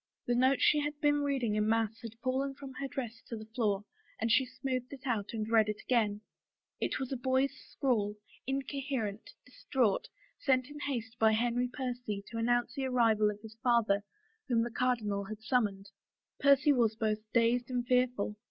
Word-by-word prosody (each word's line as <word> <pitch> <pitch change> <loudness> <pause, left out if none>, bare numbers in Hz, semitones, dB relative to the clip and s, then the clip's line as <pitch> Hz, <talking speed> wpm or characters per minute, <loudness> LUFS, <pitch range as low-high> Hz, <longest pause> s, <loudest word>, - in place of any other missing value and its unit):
The 245 - +1
note 260 +2 +3
she 300 - +5
had 295 0 -3
been 290 -1 +3
reading 270 -6 0
in 210 0 +1
mass 225 0 +1
had 225 -1 -8
fallen 270 +1 0
from 275 -1 -9
her 275 +2 -4
dress 245 -5 -5
to 230 - -5
the 215 - -8
floor 215 -3 -1 0.3
and 225 +1 0
she 260 +3 +4
smoothed 255 -1 -3
it 275 -2 -10
out 220 -6 -1
and 215 -2 -3
read 220 -2 +4
it 210 - -3
again. 210 -4 +1 0.6
It - - -1
was 265 -1 -4
a - - 0
boy's 260 +2 +1
scrawl, 210 -6 0 0.3
incoherent, 270 -5 -3 0.2
distraught, 250 -4 0 0.3
sent 255 -1 +2
in 295 - -8
haste 235 -5 -4
by 220 0 +5
Henry 240 +2 +1
Percy 245 -5 -4
to 230 - -3
announce 240 +1 +1
the 275 -2 -2
arrival 225 -4 +3
of 210 0 -6
his 220 0 -10
father 225 -5 +3 0.4
whom 235 -3 +2
the 240 - -3
cardinal 220 -5 0
had 215 +2 -8
summoned. 205 -5 0 0.5
Percy 280 +1 +5
was 230 -4 +2
both 215 -1 0
dazed 235 +1 +2
and 245 -1 -1
fearful. 250 -4 +1
240 Hz, 180 wpm, -32 LUFS, 220-260 Hz, 0.6 s, she